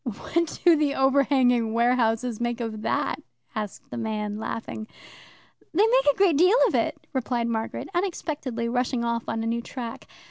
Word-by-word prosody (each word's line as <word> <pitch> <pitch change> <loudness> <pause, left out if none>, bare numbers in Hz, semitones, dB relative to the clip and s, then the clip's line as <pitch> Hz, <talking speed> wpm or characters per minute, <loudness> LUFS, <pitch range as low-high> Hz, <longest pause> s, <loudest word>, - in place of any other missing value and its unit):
"What 305 +7 -2
do 345 -2 +8
the 295 -2 +1
overhanging 260 -4 +3
warehouses 235 -1 +1
make 240 0 -1
of 225 -2 -4
that?" - - -1 0.3
asked 210 -3 -6
the - - -5
man, 215 -2 -3
laughing. 220 -1 -5 0.9
"They 405 +5 +5
make - - +3
a - - -10
great 370 -7 +4
deal 365 +8 +5
of - - -2
it," - - +1 0.2
replied 245 -2 -1
Margaret, 225 -1 -3
unexpectedly 305 -10 -2
rushing 245 0 0
off 235 0 -1
on 225 0 -2
a - - -3
new 230 +1 -1
track. 235 -1 -7
240 Hz, 165 wpm, -25 LUFS, 225-285 Hz, 0.9 s, do